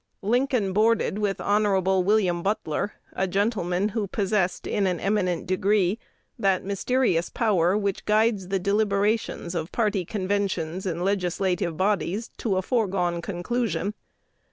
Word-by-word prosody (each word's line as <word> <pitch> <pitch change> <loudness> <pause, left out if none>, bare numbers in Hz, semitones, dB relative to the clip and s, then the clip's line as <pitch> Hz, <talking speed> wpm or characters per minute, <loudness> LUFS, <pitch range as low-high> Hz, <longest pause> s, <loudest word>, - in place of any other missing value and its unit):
Lincoln 240 -2 +1
boarded 215 -1 +2
with 205 -2 -1
Hon. 205 -1 +2 0.2
William 185 -3 +2
Butler, 200 -1 -1 0.2
a 190 - 0
gentleman 195 -1 0
who 210 -1 -2
possessed 195 -2 0
in 200 -2 0
an 180 -2 -1
eminent 195 -4 0
degree 195 +2 +1 0.4
that 195 -2 +2
mysterious 200 -2 0
power 195 -4 +2
which 200 -2 -2
guides 210 -2 +2
the 195 +1 0
deliberations 200 -1 0
of 165 -1 -3
party 210 -5 0
conventions 190 -2 -2
and 175 0 -2
legislative 180 -3 0
bodies 200 +2 0
to 200 -5 0
a 185 - 0
foregone 185 -7 0
conclusion. 205 +3 -2
195 Hz, 130 wpm, -25 LUFS, 180-210 Hz, 0.4 s, boarded